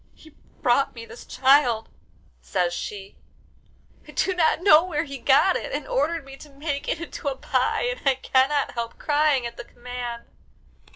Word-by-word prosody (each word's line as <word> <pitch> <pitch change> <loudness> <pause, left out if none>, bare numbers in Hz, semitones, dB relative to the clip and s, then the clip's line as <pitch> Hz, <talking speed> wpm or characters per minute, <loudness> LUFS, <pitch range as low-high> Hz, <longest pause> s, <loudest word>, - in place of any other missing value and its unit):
He 315 - -17 0.3
brought 255 +3 +2
me 230 -1 -8
this 235 - -12
child," 260 -4 +3 0.5
says 175 -2 -1
she, 195 +1 -7 0.9
"I - - -15
do 380 - +1
not 325 -3 +2
know 325 -5 +7
where 320 -4 -2
he 275 -3 -8
got 275 +9 +4
it, - - -4
and - - -4
ordered 335 - -1
me 270 0 -11
to 295 - -13
make 280 0 -4
it - - -1
into 335 -3 -7
a 275 - 0
pie, - - 0
and - - -2
I 275 -2 +3
cannot 270 +2 +1
help 235 -1 -5
crying 295 -4 +2
at 235 - -6
the - - -6
command." 240 -1 -7
275 Hz, 175 wpm, -24 LUFS, 240-310 Hz, 0.9 s, know